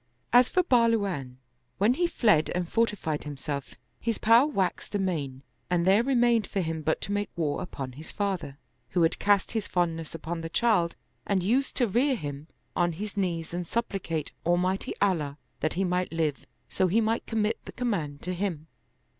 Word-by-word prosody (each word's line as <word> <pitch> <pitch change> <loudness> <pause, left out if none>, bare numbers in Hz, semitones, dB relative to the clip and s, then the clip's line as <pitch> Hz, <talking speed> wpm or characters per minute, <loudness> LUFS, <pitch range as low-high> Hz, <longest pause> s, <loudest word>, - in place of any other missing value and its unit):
As 245 0 +7
for 365 - +3
Bahluwan, 205 - +2 0.4
when 210 +5 +4
he 350 +6 +1
fled 210 - +3
and 180 -1 -1
fortified 205 -8 0
himself, 140 -1 -5 0.2
his 230 -2 -1
power 230 +5 +6
waxed 195 -6 -1
amain 150 -9 -2 0.3
and 175 -1 +2
there 195 +4 +5
remained 240 -4 +3
for 200 - -2
him 165 -3 -2
but 155 +1 0
to 200 - -3
make 205 0 -1
war 150 -4 -1
upon 135 -7 -5
his 150 +5 -10
father, 190 -9 -2 0.3
who 175 - +2
had 165 - +2
cast 205 -1 +3
his 220 -3 -2
fondness 165 -3 -1
upon 165 +1 -4
the 165 - -5
child 190 -4 +2 0.3
and 195 -3 +1
used 255 +8 +1
to 245 - +3
rear 255 +7 +2
him 145 - -6 0.3
on 175 -1 +2
his 205 +5 -6
knees 170 -5 -1
anc^ 175 0 -4
supplicate 185 -9 -2
Almighty 180 +3 0
Allah 155 -8 +1 0.2
that 155 - 0
he 190 - 0
might 180 0 0
live, 160 -4 -1 0.2
so 185 - +1
he 200 +6 +3
might 225 +1 0
commit 220 -1 0
the - - -7
command 170 - -2
to 180 - -2
him. 175 -5 -3
185 Hz, 180 wpm, -28 LUFS, 160-220 Hz, 0.4 s, As